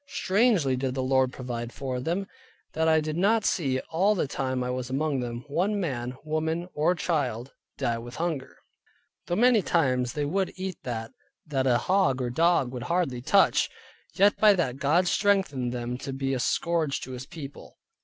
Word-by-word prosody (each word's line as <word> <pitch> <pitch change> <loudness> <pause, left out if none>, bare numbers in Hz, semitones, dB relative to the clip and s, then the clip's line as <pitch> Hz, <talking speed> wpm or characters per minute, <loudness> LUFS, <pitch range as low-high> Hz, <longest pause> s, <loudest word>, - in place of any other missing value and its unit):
strangely 190 - +2
did 130 0 -2
the 130 - -1
Lord 130 0 +2
provide 120 -2 -5
for 130 -2 -4
them; 175 +9 -2 0.5
that 160 +1 +1
I 160 0 +5
did 155 0 -3
not 205 +5 +2
see 135 -7 +1
(all 195 +6 +3
the 170 - 0
time 130 -1 -2
I 125 - -2
was 125 -1 -4
among 140 +1 0
them) 120 0 -5
one 190 +8 0
man, 125 -7 -3
woman, 160 +2 -2
or 155 +4 +2
child, 135 -8 -2 0.2
die 115 -1 -1
with 120 +2 -9
hunger. 160 -6 -3 0.7
Though 175 - 0
many 240 0 +5
times 130 -9 +1
they 150 -1 -1
would 190 +5 -1
eat 185 -2 -5
that, 115 -2 -4 0.3
that 135 -3 0
a 120 -2 +4
hog 185 -5 +2
or 125 - -1
a - - -7
dog 165 -4 +3
would 125 -2 -6
hardly 170 -8 0
touch; 195 +10 +3 0.5
yet 200 +1 +5
by 210 -1 +6
that 135 -8 -1
God 155 +6 +2
strengthened 185 - +1
them 120 0 -4
to 135 - -5
be 135 0 -2
a 130 - -1
scourge 165 +1 0
to 130 - -7
His 130 +1 -7
people. 150 -5 -10
140 Hz, 185 wpm, -27 LUFS, 125-175 Hz, 0.7 s, by